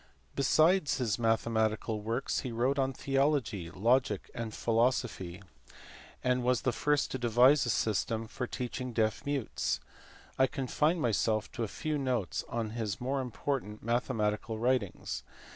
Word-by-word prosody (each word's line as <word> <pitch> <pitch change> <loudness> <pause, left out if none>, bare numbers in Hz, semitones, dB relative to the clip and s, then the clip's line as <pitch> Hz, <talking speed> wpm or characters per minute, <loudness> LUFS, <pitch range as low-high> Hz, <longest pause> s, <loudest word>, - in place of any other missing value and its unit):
Besides 155 +4 +3
his 120 -4 0
mathematical 110 -1 +1
works 115 +5 -1
he 125 - -4
wrote 125 +5 +1
on 135 0 +2
theology, 135 - 0
logic, 110 +3 +1
and 115 -2 -4
philosophy; 115 -6 0 0.8
and 125 0 +2
was 125 0 +1
the 130 - +2
first 145 +4 +1
to 130 - -3
devise 125 +4 +5
a - - 0
system 110 +1 0
for 125 +2 -5
teaching 125 0 -4
deaf 110 -2 +1
mutes. 140 -5 -1 0.6
I 130 - +6
confine 150 +4 0
myself 110 -4 +1
to 120 - -3
a - - -1
few 150 +7 -2
notes 125 -8 -1
on 115 -2 -2
his 110 -5 -3
more 135 +2 -1
important 125 -3 -3
mathematical 110 -2 0
writings. 120 -4 -1
120 Hz, 140 wpm, -31 LUFS, 110-130 Hz, 0.8 s, I